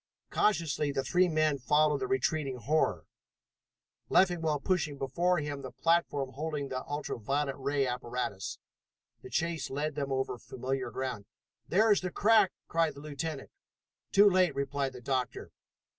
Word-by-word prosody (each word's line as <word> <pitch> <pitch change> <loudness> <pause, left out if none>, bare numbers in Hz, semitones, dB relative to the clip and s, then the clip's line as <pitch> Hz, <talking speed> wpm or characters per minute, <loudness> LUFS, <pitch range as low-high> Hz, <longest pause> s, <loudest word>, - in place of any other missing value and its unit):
Cautiously 165 -7 +1
the 135 -1 -1
three 180 +7 +3
men 155 -3 +2
followed 150 +3 +3
the 130 - -2
retreating 130 +1 0
horror, 150 +6 0 1.0
Leffingwell 165 -5 +3
pushing 165 -3 0
before 170 +7 +1
him 145 -2 -3
the 130 - -6
platform 155 -5 +1
holding 145 0 -3
the 130 0 -3
ultra 145 -4 -4
violet 135 +4 -1
ray 140 0 0
apparatus. 125 -5 -3 0.6
The - - -10
chase 170 -1 -1
led 145 +3 -2
them 140 -1 -3
over 130 -2 -1
familiar 130 +1 -3
ground. 125 -5 -4 0.4
"There 215 +4 +4
is 205 - +4
the 185 - -2
crack!" 210 +1 +4 0.2
cried 165 -1 +1
the - - -10
lieutenant. 150 0 -5 0.6
"Too 205 +1 +7
late!" 185 -6 +3
replied 140 -1 -1
the 125 - -10
doctor. 130 0 -2
145 Hz, 145 wpm, -31 LUFS, 130-165 Hz, 1.0 s, Too